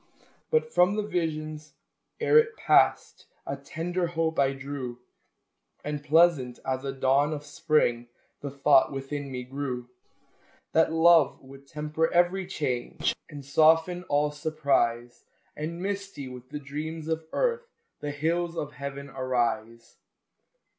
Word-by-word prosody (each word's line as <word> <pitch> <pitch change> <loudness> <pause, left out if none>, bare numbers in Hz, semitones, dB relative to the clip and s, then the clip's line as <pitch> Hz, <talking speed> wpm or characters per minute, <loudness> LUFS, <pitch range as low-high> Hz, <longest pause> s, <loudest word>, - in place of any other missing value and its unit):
But 470 0 +1
from 180 +3 +4
the 210 - 0
vision 155 -5 -2 0.6
ere 455 - +6
it 455 -1 0
passed - - +2 0.2
A 140 - -3
tender 170 +6 -3
hope 165 -1 -1
I 135 -1 +4
drew, 135 -3 -6 0.9
And, 150 -1 -4
pleasant 150 -5 +3
as 130 0 -2
a 135 - -2
dawn 135 +3 +2
of 150 -1 -6
spring, 145 -6 +1 0.3
The 145 - -5
thought 140 0 +4
within 140 +1 -5
me 125 -1 -4
grew, 125 -2 -5 0.8
That 160 0 +3
love 165 -2 +5
would 135 +1 -14
temper 155 +3 -1
every 175 +2 +2
change, 130 -9 -2
And 145 -3 -9
soften 160 +5 +4
all 145 0 +1
surprise, 140 -6 0 0.3
And, 165 +3 -5
misty 195 -6 -4
with 125 0 -10
the 150 - -5
dreams 155 +3 -6
of 160 0 -2
earth, 475 -1 0 0.3
The 145 - -4
hills 165 +4 -1
of 150 - -3
Heaven 140 0 -7
arise. 115 -4 -2
150 Hz, 135 wpm, -27 LUFS, 135-165 Hz, 0.9 s, ere